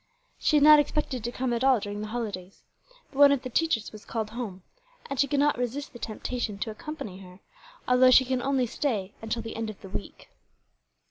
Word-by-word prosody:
She - - +2
had 290 - +5
not 300 0 +9
expected 290 -4 -1
to 240 - -3
come 250 0 -2
at 235 +1 -1
all 265 -3 +5
during 205 0 -5
the 215 - -4
holidays; 205 -5 -6 0.5
but 275 - -8
one 285 -1 +8
of 275 -2 +1
the 255 - -6
teachers 315 -6 0
was 215 -1 -12
called 220 -2 -4
home, 215 -6 -6 0.4
and 275 -2 -5
she 280 - +4
could 280 +1 0
not 290 -3 +2
resist 250 +4 -3
the 240 - -10
temptation 225 -1 -4
to 220 +2 -3
accompany 215 -6 -7
her, 180 -1 -13 0.5
although 250 +1 +6
she 260 +1 +7
can 255 0 -1
only 270 -1 +1
stay 220 -6 -2
until 225 +1 -3
the 225 - -7
end 225 -1 -3
of 215 - -9
the 195 - -10
week." 205 - -7
240 Hz, 215 wpm, -27 LUFS, 215-275 Hz, 0.5 s, not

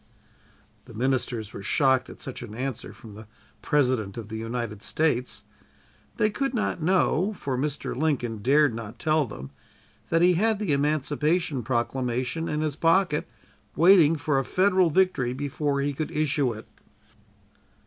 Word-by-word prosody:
The 115 - -13
ministers 120 -3 -1
were - - -7
shocked 130 +4 +2
at - - -10
such 130 - -7
an 110 -3 -8
answer 125 -1 -4
from 110 -3 -13
the 110 +1 -12 0.3
President 125 -9 0
of 110 -2 -7
the 110 - -6
United 115 -2 -4
States. 130 -4 -1 0.7
They 215 - +2
could 270 +2 -2
not 210 -6 -1
know, 185 +3 +2
for 135 -7 -3
Mr. 145 +3 -3
Lincoln 125 -6 -1
dared 140 +4 +3
not 115 0 -7
tell 155 +2 +1
them, 70 - -9 0.6
that 165 +1 +3
he 180 +1 +5
had 215 +5 +2
the 200 -8 -1
Emancipation 150 +1 0
Proclamation 130 +5 -2
in 150 0 -1
his 155 -3 -1
pocket 165 -1 +2 0.5
waiting 170 -2 +6
for 145 -2 0
a - - -1
Federal 185 +2 +3
victory 150 -8 +1
before 140 +1 -2
he 145 +1 -1
could 155 +3 -3
issue 145 -4 0
it! 110 -1 -9
140 Hz, 150 wpm, -26 LUFS, 120-160 Hz, 0.7 s, waiting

